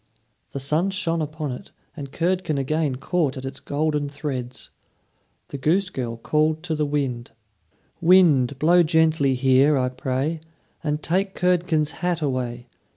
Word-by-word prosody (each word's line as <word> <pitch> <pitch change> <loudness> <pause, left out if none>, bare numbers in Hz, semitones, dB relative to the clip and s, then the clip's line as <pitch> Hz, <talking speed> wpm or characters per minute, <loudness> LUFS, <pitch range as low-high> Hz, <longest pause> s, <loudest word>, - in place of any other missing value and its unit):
The 140 - -5
sun 155 +8 0
shone 170 -4 -1
upon 155 -1 -4
it, 125 - -9 0.2
and 140 -3 -7
Curdken 175 -2 -1
again 145 0 0
caught 140 +1 -1
at 130 - -6
its 135 0 -6
golden 150 0 -1
threads. 135 -4 -6 0.8
The 140 - -6
goose 180 +7 +1
girl 120 -5 -4
called 155 +6 0
to 175 -3 -2
the 150 -1 0
wind: 135 -5 -2 0.7
"Wind, 160 -8 +5
blow 170 +5 +5
gently 160 -4 +2
here, 135 +3 +4
I 125 -1 +1
pray, 130 +5 -2 0.4
And 150 0 -2
take 190 +3 -1
Curdken's 170 -4 +1
hat 175 -2 0
away. 125 -3 -2
150 Hz, 145 wpm, -23 LUFS, 135-165 Hz, 0.8 s, Wind